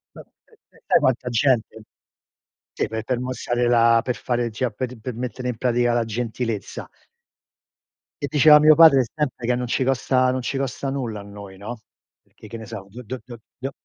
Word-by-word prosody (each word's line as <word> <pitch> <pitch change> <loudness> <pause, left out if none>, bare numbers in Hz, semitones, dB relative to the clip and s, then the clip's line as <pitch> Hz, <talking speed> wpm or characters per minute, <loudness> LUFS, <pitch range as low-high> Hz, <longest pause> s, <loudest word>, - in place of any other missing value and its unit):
Ma - - -10
e - - -26 0.2
e - - -24
sai - - +5
quanta 125 -1 0
gente? 120 -2 +1 0.9
Sì, - - -1
per 110 0 -4
per 125 +1 -2
mostrare 125 -1 -2
la 115 -1 +4
per 125 - -2
fare 120 -2 -2
cioè 115 +2 -2
pe 130 +5 -3 0.2
per 125 +2 -5
mettere 125 +1 -5
in 115 - -4
pratica 120 -1 +1
la 120 -1 +1
gentilezza. 115 -2 -4 1.3
E - - -1
diceva 150 +1 +6
mio 155 +1 +7
padre 155 -5 +7
sempre 140 -6 -3
che 125 - +2
non 125 0 -2
ci 130 - 0
costa 130 0 +1
non 130 - -2
ci 135 +2 -3
costa 135 0 -3
nulla 120 -6 -4
a - - -9
noi, 100 -1 -11
no. 110 +3 -8 0.4
Perché, - - -16
che 115 - -8
ne 110 - -9
so, 100 -3 -8
do 120 +5 -10
do 125 +3 -6
do 120 -2 -10 0.2
do 135 +2 -4
120 Hz, 195 wpm, -22 LUFS, 115-130 Hz, 1.3 s, mio